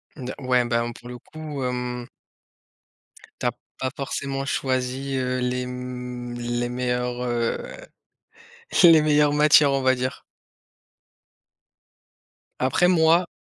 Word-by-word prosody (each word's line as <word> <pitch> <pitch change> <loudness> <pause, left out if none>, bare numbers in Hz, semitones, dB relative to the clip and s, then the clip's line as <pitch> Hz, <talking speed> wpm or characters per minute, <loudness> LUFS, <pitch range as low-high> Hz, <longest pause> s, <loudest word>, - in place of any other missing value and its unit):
De 130 -3 -6
ouais 125 -2 +2
ben, 120 0 0
pour 120 - -13
le 125 - -7
coup, 150 -1 -7
hem 125 -1 -3 1.3
Tu - - -4
as - - +3 0.3
pas 130 - -1
forcément 135 0 -3
choisi, 130 0 -2
heu, 130 0 -1
les, 125 0 -1
m 125 -1 -6
les 120 0 -2
meilleurs, 125 0 -2
heu, 120 -1 0 1.3
les 165 -3 +8
meilleures 150 -1 +3
matières, 150 -1 +6
on 135 0 0
va 130 0 +4
dire. 130 0 -4 2.4
Après 130 +7 +3
moi 170 0 +4
125 Hz, 115 wpm, -24 LUFS, 125-140 Hz, 2.4 s, les